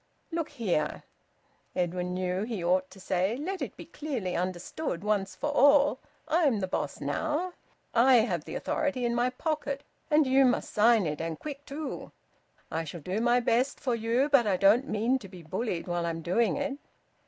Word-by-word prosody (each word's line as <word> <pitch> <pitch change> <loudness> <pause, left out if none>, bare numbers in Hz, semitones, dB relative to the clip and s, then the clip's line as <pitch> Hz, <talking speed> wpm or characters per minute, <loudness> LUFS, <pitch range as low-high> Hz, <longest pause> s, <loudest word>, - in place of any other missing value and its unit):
"Look 330 -1 -2
here," 180 - -1 0.7
Edwin 180 0 -1
knew 185 0 -1
that 210 - -2
he 220 -7 -3
ought 185 +2 +2
to 190 - -14
say. 190 +4 0
"Let 370 +7 -4
it - - -5
be - - -9
clearly 250 -12 -4
understood 180 - -3
once 205 -2 0
for 295 - -2
all 285 -1 +5 0.3
I'm 300 -9 +3
the 190 - -1
boss - - -3
now! 325 +4 -1 0.4
I 250 +3 +6
have 175 -9 -2
the - - -6
authority 265 -4 -1
in 235 - +1
my 240 +1 +2
pocket 285 0 -3 0.3
and 305 -1 +5
you 265 +1 +5
must 250 -2 +1
sign 220 -1 +5
it, 150 -1 -2
and 165 -1 -3
quick 285 -1 -8
too! 295 +1 -5 0.6
I 165 +1 -1
shall 165 +1 -7
do 185 +8 -2
my 240 +1 +3
best 245 +3 +1
for 255 - -1
you, 230 +4 +1
but 275 -6 +4
I 190 -3 +2
don't 215 +9 +4
mean 230 +5 +1
to 205 - -10
be 180 -3 -11
bullied 185 +2 -3
while 175 -1 -1
I'm 165 -1 -3
doing 220 - +2
it!" 280 0 -3
230 Hz, 190 wpm, -29 LUFS, 185-280 Hz, 0.7 s, I